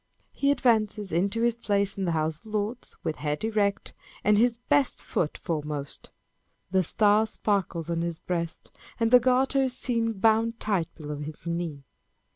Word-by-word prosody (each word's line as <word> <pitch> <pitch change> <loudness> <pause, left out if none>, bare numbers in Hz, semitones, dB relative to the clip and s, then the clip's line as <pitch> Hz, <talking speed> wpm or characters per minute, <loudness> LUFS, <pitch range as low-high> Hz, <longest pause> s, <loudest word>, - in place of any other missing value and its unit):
He 280 - 0
advances 215 -7 +2
into 195 +7 +1
his 235 -1 +2
place 200 -3 0
in 195 - -2
the 170 - 0
House 155 0 -1
of 225 - -18
Lords, 215 +3 -3
with 155 - -2
head 150 +2 -2
erect, 205 -2 0 0.3
and 210 +1 +4
his 235 +2 +3
best 270 +3 +1
foot 155 - -1
foremost. 150 -4 -4 0.6
The 190 -1 +3
star 210 +4 +3
sparkles 195 -7 -1
on 170 -1 -1
his 170 -1 -2
breast, 170 -2 -4 0.3
and 230 0 +2
the 250 - +9
garter 260 +2 +2
is 260 -1 -1
seen 230 -3 0
bound 225 +3 +2
tight 195 -6 0
below 150 -2 -6
his 150 +2 -8
knee. 170 -4 -3
205 Hz, 165 wpm, -27 LUFS, 165-230 Hz, 0.6 s, the